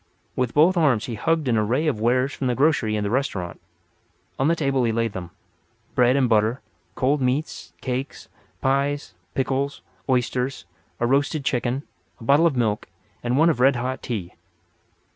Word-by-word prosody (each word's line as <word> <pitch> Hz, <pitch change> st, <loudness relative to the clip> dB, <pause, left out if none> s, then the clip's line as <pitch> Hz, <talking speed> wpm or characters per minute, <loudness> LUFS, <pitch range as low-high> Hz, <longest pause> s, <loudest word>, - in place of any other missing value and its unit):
With 125 Hz, -2 st, -1 dB
both 170 Hz, +5 st, +5 dB
arms 140 Hz, -10 st, +3 dB
he 120 Hz, -, -5 dB
hugged 160 Hz, +6 st, 0 dB
an 115 Hz, -3 st, +3 dB
array 120 Hz, +9 st, +1 dB
of 145 Hz, -9 st, 0 dB
wares 125 Hz, +4 st, +2 dB
from 130 Hz, -, -2 dB
the 125 Hz, -, +1 dB
grocery 135 Hz, -7 st, +2 dB
and 105 Hz, -1 st, -1 dB
the 100 Hz, -, -1 dB
restaurant. 100 Hz, -10 st, -2 dB, 0.8 s
On 135 Hz, -, +2 dB
the 165 Hz, -, +3 dB
table 135 Hz, -5 st, +1 dB
he 115 Hz, -, +2 dB
laid 115 Hz, -1 st, -1 dB
them—bread 120 Hz, +7 st, -3 dB
and 135 Hz, -2 st, +3 dB
butter, 110 Hz, +2 st, +2 dB, 0.4 s
cold 140 Hz, +2 st, +1 dB
meats, 130 Hz, +5 st, -2 dB
cakes, 130 Hz, +1 st, -4 dB, 0.3 s
pies, 140 Hz, +2 st, 0 dB, 0.2 s
pickles, 135 Hz, +1 st, -1 dB, 0.3 s
oysters, 125 Hz, -5 st, 0 dB, 0.3 s
a 120 Hz, -, +1 dB
roasted 140 Hz, +3 st, +1 dB
chicken, 125 Hz, +2 st, 0 dB, 0.4 s
a -, -, -11 dB
bottle 145 Hz, +7 st, +5 dB
of 155 Hz, -, -1 dB
milk 110 Hz, -3 st, 0 dB, 0.3 s
and 120 Hz, +2 st, 0 dB
one 165 Hz, +3 st, +5 dB
of 130 Hz, -, -4 dB
red 135 Hz, +2 st, +5 dB
hot 130 Hz, +2 st, -3 dB
tea. 100 Hz, -8 st, -4 dB
130 Hz, 165 wpm, -23 LUFS, 115-140 Hz, 0.8 s, both